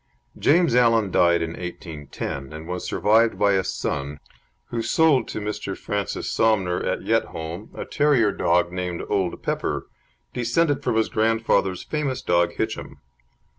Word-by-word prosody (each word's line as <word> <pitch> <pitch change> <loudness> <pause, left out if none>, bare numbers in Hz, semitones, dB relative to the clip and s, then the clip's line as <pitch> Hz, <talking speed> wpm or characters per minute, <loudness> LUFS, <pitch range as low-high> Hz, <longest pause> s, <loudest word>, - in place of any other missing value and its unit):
James 170 -1 +3
Allan 115 -5 +4
died 85 -1 +3
in 80 - -3
1810, 75 -5 -6
and 80 +1 -8
was 90 0 -4
survived 110 +2 +3
by 100 -1 +3
a 95 -1 +2
son 70 -4 -3 0.5
who 115 - -2
sold 135 +1 +3
to - - -4
Mr. 105 -2 -4
Francis 100 -3 -3
Somner 95 -6 +1
at - - -2
Yetholm 80 +5 -2
a - - -5
terrier 140 -8 +3
dog 85 -1 +1
named 90 -1 -3
Old 95 -4 -1
Pepper, - - -2 0.5
descended 135 +5 +1
from - - -1
his 110 0 +2
grandfather's 110 -4 +1
famous 150 -4 -2
dog 85 0 +2
Hitchem. - - -4
100 Hz, 140 wpm, -23 LUFS, 85-115 Hz, 0.5 s, Allan